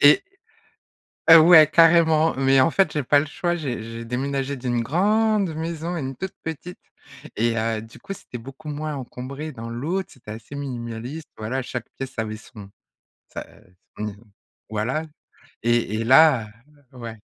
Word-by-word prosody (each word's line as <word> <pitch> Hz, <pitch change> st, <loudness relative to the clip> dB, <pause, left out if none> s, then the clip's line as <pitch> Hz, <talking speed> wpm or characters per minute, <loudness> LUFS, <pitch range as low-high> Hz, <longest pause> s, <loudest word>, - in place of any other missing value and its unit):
et 390 Hz, -, +7 dB, 1.1 s
heu, 165 Hz, -, +12 dB
ouais 160 Hz, -1 st, +9 dB
carrément! 165 Hz, 0 st, +5 dB
Mais 135 Hz, 0 st, +4 dB
en 145 Hz, -, +4 dB
fait 190 Hz, -3 st, +2 dB
j'ai 150 Hz, -, -1 dB
pas 145 Hz, +3 st, +4 dB
le 145 Hz, -, +2 dB
choix, 175 Hz, +4 st, -2 dB
j'ai 130 Hz, -8 st, -4 dB
j'ai 115 Hz, +1 st, -7 dB
déménagé 135 Hz, +3 st, -2 dB
d'une 120 Hz, -2 st, -1 dB
grande 200 Hz, -, +2 dB
maison 165 Hz, +2 st, -4 dB
à 170 Hz, -, -3 dB
une 135 Hz, -1 st, -5 dB
toute 190 Hz, 0 st, -5 dB
petite, 160 Hz, +3 st, -6 dB, 0.6 s
et 115 Hz, +1 st, +1 dB
heu, 110 Hz, 0 st, -1 dB
du 115 Hz, +1 st, -14 dB
coup 200 Hz, 0 st, -7 dB
c'était 180 Hz, -, -9 dB
beaucoup 135 Hz, +5 st, -11 dB
moins 150 Hz, 0 st, -4 dB
encombré, 135 Hz, +4 st, -7 dB
dans 115 Hz, -2 st, -8 dB
l'autre, 165 Hz, +11 st, -3 dB
c'était 115 Hz, -4 st, -10 dB
assez 110 Hz, +6 st, -10 dB
minimaliste, 125 Hz, +2 st, -6 dB
voilà, 125 Hz, +5 st, -2 dB
chaque 125 Hz, -1 st, -5 dB
pièce 135 Hz, -1 st, -5 dB
avait 110 Hz, -1 st, -2 dB
son 105 Hz, -2 st, -12 dB, 0.6 s
sa, -, -, -6 dB
heu, 90 Hz, -, -17 dB, 0.2 s
son 105 Hz, -, -3 dB
ne 105 Hz, -, -4 dB, 0.6 s
voilà 115 Hz, +8 st, -1 dB, 0.6 s
et, 120 Hz, -2 st, +1 dB
et 115 Hz, -, -1 dB
là, 130 Hz, -2 st, +6 dB, 0.5 s
heu, -, -, -14 dB
ouais. 115 Hz, -2 st, -7 dB
135 Hz, 170 wpm, -23 LUFS, 115-160 Hz, 1.1 s, heu